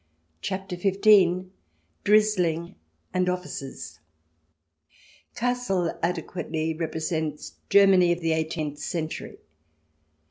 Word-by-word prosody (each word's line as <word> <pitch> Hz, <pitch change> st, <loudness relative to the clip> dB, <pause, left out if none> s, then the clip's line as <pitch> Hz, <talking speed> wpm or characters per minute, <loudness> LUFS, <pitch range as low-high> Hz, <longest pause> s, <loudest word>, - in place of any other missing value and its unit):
CHAPTER 190 Hz, -1 st, -4 dB
XV 185 Hz, -1 st, +4 dB, 0.5 s
"DRIZZLING" 185 Hz, -6 st, +2 dB, 0.4 s
AND 180 Hz, 0 st, +1 dB
OFFICERS 135 Hz, -, -6 dB, 1.4 s
Kassel 230 Hz, -9 st, 0 dB
adequately 165 Hz, -2 st, -2 dB
represents 160 Hz, -1 st, -3 dB, 0.2 s
Germany 195 Hz, -3 st, +6 dB
of 175 Hz, -, 0 dB
the 165 Hz, -1 st, 0 dB
eighteenth 155 Hz, -2 st, -2 dB
century. 160 Hz, +1 st, -4 dB
175 Hz, 75 wpm, -26 LUFS, 160-190 Hz, 1.4 s, Germany